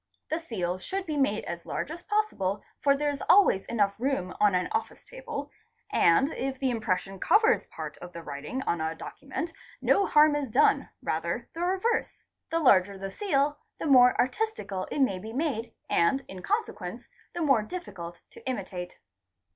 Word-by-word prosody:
The 315 - +1
seals 185 - -3
should 385 0 -3
be 310 - -3
made 270 -7 +1
as 170 0 -5
large - - -4
as 340 +2 -7
possible 315 - -1 0.2
for 280 -1 +3
there 295 0 +1
is 285 - -6
always 380 - +5
room 235 - -3 0.2
enough 250 -9 -1
on 205 -3 +4
an 180 - +1
office 445 +1 -3
table, 455 -13 -7 0.4
and 265 - +4
if 265 0 -3
the 265 -1 0
impression 195 -4 -2
covers 440 - +4
part - - -7
of 175 - -9
the 170 -1 -8
writing 150 - -5
on 170 -9 -1
a 160 +1 -1
document 285 - -6 0.3
no 400 - +3
harm 300 0 +6
is 285 -3 -2
done—rather - - +1
the 330 - -5
reverse. 380 +6 0 0.2
The 330 - 0
larger 200 - +4
the 195 0 -5
seal 290 - 0 0.2
the - - -5
more 250 -4 +7
artis 440 - +1
tical 190 -2 -5
it 285 - -1
may 195 -9 +2
be 220 +4 -8
made 250 -5 -1 0.2
and 265 +11 +2
in 185 -1 -8
consequence 425 - -3 0.3
the 345 - -2
more 270 -7 +4
difficult 200 - -7
to - - -14
imitate. 185 -6 -5
265 Hz, 175 wpm, -28 LUFS, -, 0.4 s, more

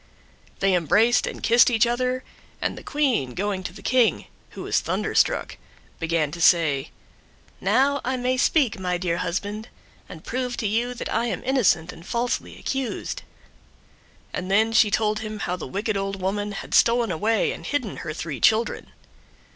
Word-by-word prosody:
They 195 -1 +3
embraced 205 +8 +3
and - - -7
kissed 235 +2 +6
each 230 -1 +3
other, 250 +2 -1 0.4
and - - -2
the - - -9
Queen 255 - 0
going 195 0 -2
to - - -4
the 195 +2 -13
King, 250 -3 +2 0.3
who - - -5
was - - +1
thunderstruck, - - 0 0.4
began 165 -3 0
to 170 - -7
say, 155 -5 +3 0.7
"Now 280 +2 +2
may 255 0 0
I - - -1
speak, 255 -6 +2
my 180 -1 -1
dear 175 -1 -1
husband, 205 +6 -3 0.4
and 160 - -10
prove 250 0 -3
to 215 - -1
you 235 +4 -1
that - - -4
I 230 +1 +1
am 200 - -3
innocent 215 -10 +2
and 165 - -13
falsely 235 +6 -2
accused;" 265 -3 -3 1.1
and 185 +1 -4
then 220 +3 +3
she 225 -2 +5
told 215 0 +1
him 215 -1 -5
how 180 -3 -2
the 180 - -7
wicked 205 - -2
old 195 0 -2
woman 205 +2 -2
had - - -7
stolen 235 -2 +4
away 215 +7 +1
and - - -8
hidden 265 -9 -2
her 155 - -5
three 155 -2 -5
children. 225 +1 +2
215 Hz, 170 wpm, -24 LUFS, 180-240 Hz, 1.1 s, kissed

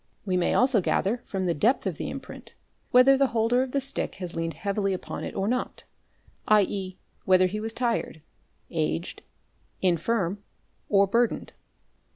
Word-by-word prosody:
We 185 -2 0
may 180 - +1
also 250 -4 +4
gather 215 +6 0
from 190 -2 -3
the 175 - +1
depth 225 - +2
of - - -2
the - - -4
im - - -5
print - - -11 0.3
whether 255 +2 +6
the 275 0 +3
holder 230 +3 +3
of 260 -1 -3
the 280 - +1
stick 270 0 -3
has 180 -3 -6
leaned 165 0 -3
heavily 200 -1 -1
upon 185 - -5
it - - -6
or 195 - -1
not, 250 +2 -2 0.6
7.e., 195 -3 +2 0.3
whether 185 0 +5
he 200 +4 -2
was 220 +1 -3
tired, 230 -10 -2 0.5
aged, 165 +1 -2 0.6
infirm, 185 +2 0 0.5
or 200 -1 +5
burdened. 230 +4 0
200 Hz, 165 wpm, -26 LUFS, 185-235 Hz, 0.6 s, whether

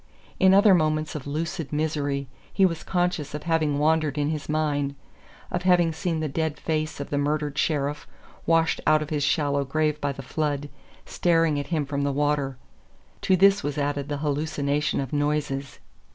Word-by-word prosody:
In 190 - +6
other 200 +1 +6
moments 155 -2 +1
of 145 -2 -6
lucid 165 +2 -3
misery 145 -2 -1 0.2
he 195 - +4
was 165 -3 -1
conscious 175 -5 -1
of 150 - -6
having 160 -4 +1
wandered 155 -1 +1
in 145 0 +1
his 150 -1 -5
mind; 145 -2 0 0.6
of 175 - -1
having 175 -2 +3
seen 165 -1 -2
the 155 - -1
dead 155 +1 -2
face 155 -2 -2
of 140 - -6
the 145 - +1
murdered 150 0 -1
sheriff, 145 -1 -1 0.4
washed 165 0 +2
out 155 0 +4
of 150 - -10
his 150 -2 0
shallow 140 -1 +1
grave 150 +2 -1
by 145 - 0
the 135 0 -8
flood, 145 +1 -2 0.4
staring 165 -4 +2
at 140 - -5
him 155 -3 -1
from 140 0 -3
the 140 0 0
water; 145 -2 0 0.6
to 190 - +3
this 195 +2 +5
was 145 +1 -3
added 145 0 -2
the 145 - -2
hallucination 150 0 -1
of 135 -1 -4
noises. 145 -2 -1
150 Hz, 180 wpm, -25 LUFS, 145-160 Hz, 0.6 s, In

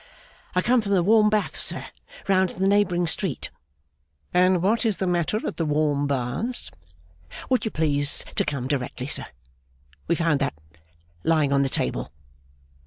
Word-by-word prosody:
'I 180 - +2
come 250 0 +3
from 200 -2 -2
the 180 -3 +3
warm 210 +2 +5
baths, 210 -1 -1
sir, - - 0 0.4
round 190 -1 +3
in - - -11
the 190 - +2
neighbouring 195 -3 +2
street.' 160 - -3 0.8
'And 180 0 +3
what 215 +4 +2
is 220 -4 +1
the 190 - -1
matter 175 +3 0
at - - -4
the 165 - 0
warm 145 -1 +1
baths?' 140 - -2 0.8
'Would 255 -1 +2
you - - 0
please 145 -4 +1
to - - +2
come 135 -4 -3
directly, 130 -2 -3
sir. 145 - +1 0.8
We 170 - +2
found 165 -4 +1
that, 140 - -1 0.7
lying 155 -4 +2
on 140 - +3
the 135 - +1
table. - - -2
175 Hz, 165 wpm, -24 LUFS, 145-200 Hz, 0.8 s, warm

